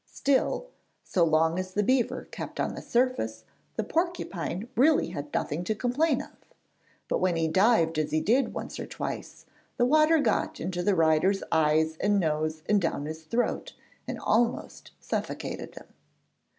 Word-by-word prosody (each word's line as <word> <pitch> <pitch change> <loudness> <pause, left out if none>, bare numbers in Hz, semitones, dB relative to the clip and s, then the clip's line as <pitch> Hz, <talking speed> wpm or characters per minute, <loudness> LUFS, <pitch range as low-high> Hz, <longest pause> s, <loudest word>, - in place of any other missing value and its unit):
Still, 280 - +1 0.4
so 180 - +1
long 160 +1 +3
as 185 0 -5
the 210 - +2
beaver 255 +2 +1
kept - - -7
on - - 0
the - - -7
surface, 235 - 0 0.3
the 220 - -1
porcupine 225 - -2
really 285 - +4
had 150 -4 -6
nothing 160 +4 -2
to 215 - 0
complain 255 +9 +1
of; - - -14 0.8
but - - 0
when 185 -2 +1
he 165 -1 +1
dived 165 -3 +3
as 155 -1 0
he 155 - +1
did 235 - +2
once - - -6
or - - -5
twice, - - -6 0.3
the 245 - +3
water 310 +4 +5
got 310 +1 0
into 180 -1 -3
the 195 +2 +2
rider's 165 +4 +3
eyes 160 0 +2
and 205 +2 +2
nose 155 -1 -1
and 205 -1 +3
down 160 -4 -1
his 160 +1 -6
throat, 235 +9 -1 0.3
and - - -4
almost 230 +1 0
suffocated - - -4
him. - - -10
185 Hz, 165 wpm, -28 LUFS, 160-245 Hz, 0.8 s, water